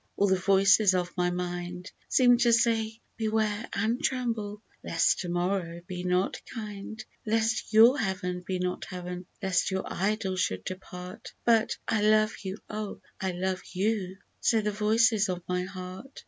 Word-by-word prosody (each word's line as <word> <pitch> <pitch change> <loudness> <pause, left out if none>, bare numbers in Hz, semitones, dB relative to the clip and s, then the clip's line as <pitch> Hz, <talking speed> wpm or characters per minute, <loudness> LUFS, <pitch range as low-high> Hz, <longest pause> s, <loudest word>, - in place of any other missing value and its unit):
All 200 - +4
the 190 -1 +4
voices 195 +1 +5
of 180 -1 -2
my 180 -1 +1
mind 180 +1 -4 0.2
Seem 245 -2 +5
to 240 -1 +4
say, 225 -1 +2
" - - -43
Beware 220 0 0
and 225 +5 0
tremble, 225 -5 -2 0.2
lest 165 - +2
to 180 - -4
morrow 175 -1 -1
be 180 0 -5
not 180 +1 0
kind; 215 -1 -6 0.2
Lest 225 0 0
your 230 +5 +7
Heaven 180 -3 -2
be 185 0 -2
not 180 0 -2
Heaven 180 -1 -6
— - - -28
lest 190 -1 +2
your 190 -1 -1
Idol 195 -1 -1
should 95 - 0
depart; 180 - -8
" - - -42
But 230 -1 +3
" - - -43
I 220 - +1
love 215 +1 +4
you, 190 +1 -4
oh! 215 -1 -5 0.2
I 190 -1 -1
love 185 +1 -2
you 190 -1 -1
/" - - -43
say 225 -2 +3
the 210 0 -1
voices 215 0 +3
of 180 -1 -3
my 180 0 -1
heart. 185 +7 -8
195 Hz, 175 wpm, -28 LUFS, 180-220 Hz, 0.2 s, your